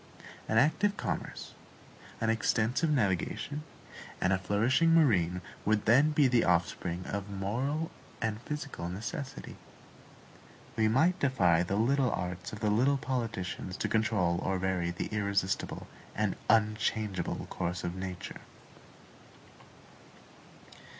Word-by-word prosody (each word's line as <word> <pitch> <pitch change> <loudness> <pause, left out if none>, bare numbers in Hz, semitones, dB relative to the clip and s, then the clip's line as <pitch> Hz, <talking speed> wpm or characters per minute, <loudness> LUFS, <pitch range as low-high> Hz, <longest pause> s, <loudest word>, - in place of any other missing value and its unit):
An 110 - +2
active 200 - +3
commerce, - - -4 0.7
an 110 0 +2
extensive 115 +6 +1
navigation, 115 - 0 0.6
and 95 - +2
a 95 - +1
flourishing 120 - +3
marine 90 - +3 0.2
would 110 0 +1
then 135 +7 +5
be 150 -2 +4
the 120 -2 +3
offspring 90 0 0
of 100 0 -4
moral 125 +11 -2 0.3
and 110 0 -2
physical 145 - -5
necessity. 105 +8 -6 1.2
We 110 -1 +3
might 160 +11 +3
defy 90 -12 +3
the 90 +3 -1
little 125 +4 +2
arts 90 0 -4
of 105 - -8
the 105 - +2
little 130 +6 +3
politicians 115 -8 -3
to - - -1
control 100 -6 +1
or 95 - 0
vary 90 -2 0
the 85 - -3
irresistible 100 -2 -1 0.3
and 105 -2 0
unchangeable 110 -3 +1
course 90 -1 -3
of 85 - -2
nature. 95 -1 -6
105 Hz, 115 wpm, -31 LUFS, 95-130 Hz, 1.2 s, then